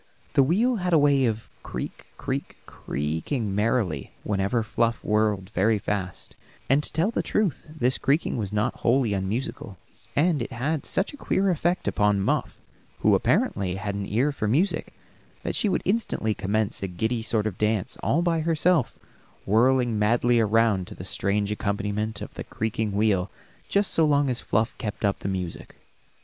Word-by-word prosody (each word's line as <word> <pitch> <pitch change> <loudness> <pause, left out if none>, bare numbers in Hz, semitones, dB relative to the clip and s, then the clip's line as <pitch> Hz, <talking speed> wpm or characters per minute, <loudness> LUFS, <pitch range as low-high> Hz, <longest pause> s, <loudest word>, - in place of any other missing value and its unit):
The - - +5
wheel 220 - +2
had 180 -2 -1
a - - +7
way 140 -2 +4
of 110 -1 -2
creak, - - -6
creak, - - -4
creaking 80 - -3
merrily 105 - 0
whenever 105 +3 0
Fluff 115 +1 0
whirled 105 -2 +1
very 105 +4 +2
fast, 100 -2 -4 0.3
and, 135 +3 +4
to - - -6
tell 165 +8 +1
the - - 0
truth, 195 -11 -1
this 130 -5 +1
creaking 145 +4 +1
was 105 -4 -3
not 105 +2 -1
wholly 120 -3 +2
unmusical; 100 0 -3 0.4
and 155 -1 +2
it 120 - -4
had 140 +5 -2
such 190 - 0
a - - -10
queer 195 -7 +1
effect 175 +2 0
upon 105 -1 +2
Muff, 95 - -1 0.4
who - - +4
apparently 95 -2 +1
had 100 +1 -3
an 100 0 -4
ear 125 +8 +1
for 110 -6 -3
music, 155 - +1 0.5
that - - -2
she 210 - +2
would - - 0
instantly 190 - 0
commence 105 +1 -1
a 95 - -2
giddy 110 +6 -2
sort 110 -1 0
of 100 -4 -3
dance, 105 +1 0
all 170 +4 +1
by 170 -2 +1
herself, 160 - +2 0.5
whirling 120 +1 +3
madly 120 +3 +3
around 110 -4 +2
to - - -9
the 90 - -8
strange 100 +2 0
accompaniment 105 +1 -2
of - - -9
the - - -6
creaking 110 -1 -2
wheel 100 -2 +2 0.4
just 200 0 +2
so 165 - +4
long 145 -3 +3
as 125 - -2
Fluff 110 +1 0
kept 105 0 -3
up 100 - +1
the - - -5
music. 90 -3 -5
110 Hz, 170 wpm, -25 LUFS, 100-145 Hz, 0.5 s, a